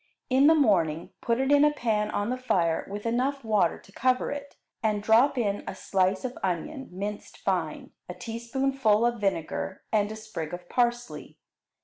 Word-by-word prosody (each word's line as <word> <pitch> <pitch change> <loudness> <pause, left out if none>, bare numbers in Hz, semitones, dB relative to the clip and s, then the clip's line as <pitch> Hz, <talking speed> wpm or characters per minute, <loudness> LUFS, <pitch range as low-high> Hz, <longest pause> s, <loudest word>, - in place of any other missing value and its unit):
In 270 +3 +6
the 320 - +7
morning 175 - +2
put 235 +1 0
it 265 +1 +1
in 290 0 +6
a 300 - +6
pan 220 -7 0
on 205 +3 -1
the 255 - -1
fire 170 -10 +1
with 205 +2 -6
enough 255 +4 0
water 210 -6 +2
to - - -19
cover 255 +4 +1
it, 285 0 -7 0.3
and 210 -2 0
drop 230 +6 +4
in 205 -4 0
a - - -4
slice 190 +2 0
of 250 - -5
onion, 195 - -3
minced 205 +3 -6
fine, 175 -5 -2 0.2
a 180 - -5
teaspoonful 235 +1 0
of 240 -2 0
vinegar, 190 -1 -2
and 210 -1 +2
a - - -5
sprig 180 -7 -5
of 175 0 -13
parsley. 240 0 -1
220 Hz, 175 wpm, -27 LUFS, 195-255 Hz, 0.3 s, the